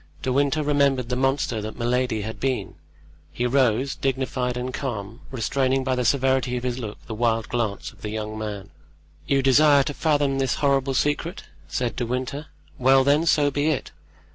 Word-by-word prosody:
De 130 - 0
Winter 140 +3 +2
remembered 140 -4 +2
the 125 - 0
monster 135 -3 0
that 110 +1 -6
Milady 120 -2 0
had 110 +1 -6
been; 130 -7 -2 0.6
he 120 - -2
rose, 130 +1 +2
dignified 130 -2 -1
and 125 +1 -4
calm, 115 -3 -5
restraining 130 +1 0
by 130 0 0
the 125 - 0
severity 130 -1 +2
of 120 - -5
his 125 0 -2
look 110 -4 -7
the 110 - -6
wild 115 0 0
glance 115 -4 -2
of - - -22
the 105 - -4
young 110 0 -4
man. 105 -2 -6 0.6
"You 135 -1 +2
desire 140 +1 +5
to 145 - -4
fathom 145 -3 +1
this 135 -3 +1
horrible 135 -1 +1
secret?" 150 +7 -1 0.2
said 120 -3 -2
De 120 - -1
Winter; 130 +5 -3 0.3
"well, 135 +1 +5
then, 145 +4 +3
so 145 -2 +3
be 145 +2 0
it. 155 -3 -1
130 Hz, 180 wpm, -24 LUFS, 120-140 Hz, 0.6 s, desire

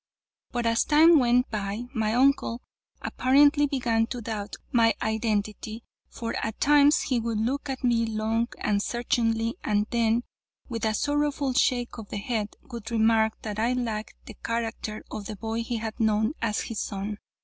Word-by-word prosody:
But 240 -1 -2
as 230 0 +3
time 315 +2 +6
went 245 0 +2
by, 205 +1 -3
my 220 -2 0
uncle 255 -2 +2 0.4
apparently 285 +3 +4
began 235 -5 +1
to 245 - -5
doubt 210 -3 -5 0.2
my 230 -2 +4
identity, 220 0 -2 0.3
for 230 -1 -5
at 220 -1 -4
times 295 +1 +5
he 255 -4 0
would 230 -1 -2
look 270 +6 -1
at 265 -1 -4
me 235 -2 +2
long 225 +1 0
and 205 -1 0
searchingly, 230 -1 0
and 210 0 +1
then, 235 0 +2 0.4
with 230 -2 -3
a 215 -1 +1
sorrowful 290 0 0
shake 245 -1 +1
of 215 - -9
the - - -4
head, 215 0 -3
would 235 -6 -8
remark 220 -1 +2
that 210 -1 -4
I 235 +3 +2
lacked 225 -4 -3
the - - -9
character 225 -2 -3
of 205 - -5
the 215 - -5
boy 225 +2 -3
he 230 0 -3
had 220 +1 -5
known 220 +2 +2
as 215 -2 0
his 225 -3 -5
son. 205 +1 -4
230 Hz, 170 wpm, -26 LUFS, 220-245 Hz, 0.4 s, time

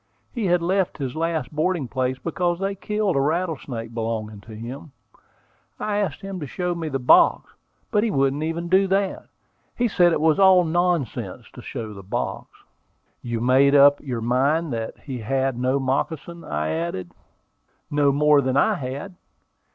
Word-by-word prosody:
He 230 -6 -2
had 175 -1 +2
left 190 +1 0
his 135 -4 -4
last 165 0 -2
boarding 155 -3 0
place 130 0 -1
because 175 +3 -1
they 195 +2 -2
killed 210 -1 -1
a 135 - +3
rattlesnake 145 -7 -2
belonging 110 -2 -4
to 110 +1 -11
him. 130 +7 -8 0.9
I 210 -1 -1
asked 205 0 -2
him 195 -2 -6
to 150 - -5
show 180 +5 -2
me 165 -2 -4
the 135 - -1
box, 125 -1 +4 0.4
but 210 - +2
he 230 - +1
wouldn't 135 -4 +1
even 165 +2 -2
do 190 +2 +4
that, 195 0 -1 0.5
and 240 -3 +1
said 175 -3 +4
it 165 - +1
was 160 +3 +3
all 190 -2 +6
nonsense 175 -5 -1
to - - -10
show 110 -2 -6
the 100 - -10
box." 95 - -4 0.7
"You 120 -2 -3
made 135 +3 +4
up 145 0 +6
your 125 -5 -4
mind 135 +6 +1
that 115 -1 -4
he 130 -4 -6
had 135 +3 -1
no 130 +2 +1
moccasin?" 150 +5 -2
I 75 +1 -2
added. 85 +3 -3 0.8
"No 145 -1 +3
more 150 +1 +4
than 130 0 0
I - - +4
had. 140 +8 -5
145 Hz, 170 wpm, -23 LUFS, 125-175 Hz, 0.9 s, all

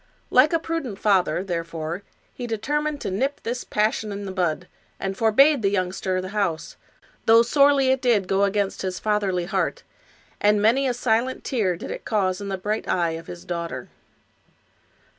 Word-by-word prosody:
Like 255 +4 +6
a 335 - +3
prudent 320 -10 -4
father, 185 -5 +2
therefore, 170 -1 -4 0.3
he 245 - -6
determined 290 +7 -1
to - - -3
nip 270 +9 -1
this 245 +2 -3
passion 215 0 0
in 200 0 -5
the 190 - -5
bud, 180 -2 -1 0.3
and 195 0 -3
forbade 265 +7 +4
the 200 - +2
youngster 185 -1 -1
the 185 0 -5
house, 180 -6 -2 0.5
though 225 +1 +7
sorely 275 +1 +4
did 245 -6 +2
it - - -15
go 195 +1 +2
against 200 0 0
his 185 -1 -3
fatherly 200 -4 0
heart, 190 +1 -1 0.6
and 210 0 +3
many 240 +6 +3
a 250 - 0
silent 245 +1 0
tear 205 -10 0
did - - -7
it - - -6
cause 190 -3 0
in 200 - -5
the 190 - -2
bright 210 +3 -3
eye 170 -2 +1
of 165 0 -7
his 175 - -9
daughter. 170 -7 -5
205 Hz, 175 wpm, -24 LUFS, 185-240 Hz, 0.6 s, though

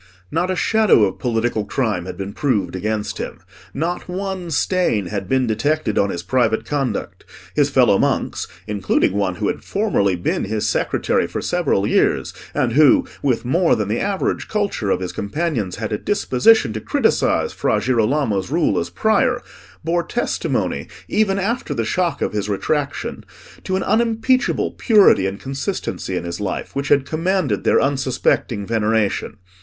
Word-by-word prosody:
Not 185 - 0
a 185 - 0
shadow 215 - +4
of 95 - 0
political 115 -2 0
crime 105 -7 -2
had 90 -1 -6
been 100 +1 -5
proved 105 -10 0
against 105 +2 -3
him. - - -5 0.3
Not 170 +6 -3
one 190 -1 -4
stain 160 - +1
had 95 0 -4
been 130 -1 +2
detected 115 +1 0
on 100 - +2
his 85 -2 -4
private 110 +2 +1
conduct: 135 -7 -3 0.3
his - - +3
fellow - - +4
monks, - - 0 0.2
including 100 -2 +1
one 100 -3 0
who 105 +1 -2
had - - -3
formerly 195 - +1
been 90 - -1
his 105 +1 -1
secretary - - 0
for - - -4
several - - 0
years, - - +1 0.2
and 115 - +1
who, 145 0 +5 0.2
with 125 -4 0
more 170 +7 +3
than 105 -2 -2
the 110 - 0
average 200 -1 -1
culture 200 - -1
of 95 - +1
his 90 -1 -3
companions, 105 - -2
had 110 0 -4
a 105 - -1
disposition 145 - +3
to 110 - -4
criticise - - +1
Fra - - +1
Girolamo's 115 -4 +1
rule 165 +3 +1
as - - -3
Prior, 245 +3 +2 0.4
bore 170 +2 +1
testimony, 240 - -2 0.2
even 200 -2 +1
after 225 +6 -2
the 115 - -1
shock 175 +7 0
of - - -2
his 105 0 -2
retraction, 140 +2 -2 0.4
to 185 - -1
an 190 - 0
unimpeachable 235 +3 +1
purity 205 - +4
and 100 +1 -5
consistency 135 0 -3
in - - -3
his 85 0 -5
life, 100 - -4
which 140 +1 -2
had 140 -2 +3
commanded 165 - 0
their - - +4
unsuspecting 130 -5 0
veneration. 110 -1 0
125 Hz, 160 wpm, -20 LUFS, -, 0.4 s, who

